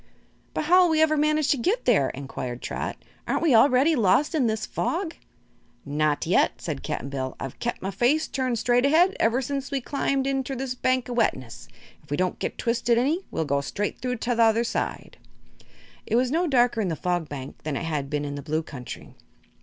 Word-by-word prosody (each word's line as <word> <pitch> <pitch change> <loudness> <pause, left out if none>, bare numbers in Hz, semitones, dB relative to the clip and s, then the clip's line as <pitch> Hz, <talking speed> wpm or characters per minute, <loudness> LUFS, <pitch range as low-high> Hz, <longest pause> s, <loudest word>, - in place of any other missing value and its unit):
"But - - 0
how'll 360 +2 +5
we 320 -1 +2
ever 315 -1 +4
manage 305 0 +2
to 285 - +3
get 390 - 0
there?" 190 - +3
inquired 130 -2 -6
Trot. - - -4 0.3
"Aren't - - 0
we 315 -6 +4
already 260 +6 +5
lost 240 - +3
in 280 -7 +2
this 220 0 -1
fog?" 340 -1 -2 0.7
"Not 150 0 0
yet," - - +2
said - - -4
Cap'n 135 - -4
Bill. 130 -2 -4
"I've 135 -2 -7
kep' 240 -4 -3
my 195 - -2
face 250 - +2
turned 255 -3 -1
straight 245 +2 +2
ahead, 330 +7 +4
ever 240 +4 +2
since 275 +1 -3
we 280 -1 -1
climbed 275 0 -1
inter 270 0 -1
this 260 0 -3
bank 255 0 0
o' 245 - -4
wetness. 130 - -1 0.3
If - - -25
we 145 - -1
don't 185 0 -1
get - - -3
twisted 235 0 +1
any, 305 +10 +1
we'll 160 - -2
go 140 -1 0
straight 205 +8 -3
through 250 +1 -2
to 245 +1 -1
the 235 - +1
other 225 +1 +4
side." 235 - -4 0.9
It - - 0
was 250 +1 +2
no 340 +3 +1
darker 245 -5 +3
in 200 - 0
the 165 - -1
Fog 175 -2 -2
Bank 135 -2 -8
than 150 -3 -3
it - - -4
had 150 -4 -2
been 145 0 -2
in 145 - -4
the 145 - -5
Blue 155 +3 -2
Country. 125 -5 -9
240 Hz, 210 wpm, -25 LUFS, -, 0.9 s, how'll